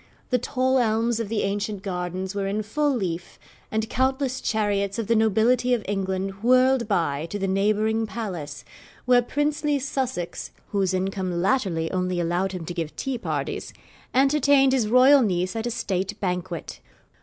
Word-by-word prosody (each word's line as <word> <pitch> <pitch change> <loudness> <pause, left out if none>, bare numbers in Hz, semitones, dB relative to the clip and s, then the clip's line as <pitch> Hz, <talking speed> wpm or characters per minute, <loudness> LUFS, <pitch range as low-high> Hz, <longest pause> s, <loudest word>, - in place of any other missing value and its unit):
The 250 - +3
tall 260 +2 +1
elms 230 0 +1
of 225 -3 -3
the 225 -1 0
ancient 200 0 -2
gardens 185 0 -3
were 200 -1 -2
in 210 +2 -1
full 290 +8 0
leaf, 180 -6 -4 0.3
and 220 0 -1
countless 260 +2 0
chariots 200 -2 0
of 230 - -2
the 230 +3 +2
nobility 225 +3 +3
of 225 - -6
England 195 0 -2
whirled 255 0 +4
by 165 -6 0
to 205 - -3
the 195 -1 -2
neighbouring 215 +3 +1
palace, 180 -11 -6 0.4
where 250 -1 +5
princely 295 +3 0
Sussex 260 -9 -3 0.2
(whose 195 -2 0
income 185 -2 -2
latterly 180 -6 0
only 180 -1 -1
allowed 175 +3 0
him 180 -3 -5
to 175 - -5
give 165 -3 -4
tea 265 -3 -3
parties) - - -3 0.4
entertained 275 0 +4
his 245 -5 +2
royal 260 +5 +6
niece 185 -3 0
at 225 +1 -2
a - - -2
state 195 -2 -2
banquet. 180 -2 -4
210 Hz, 160 wpm, -24 LUFS, 185-250 Hz, 0.4 s, royal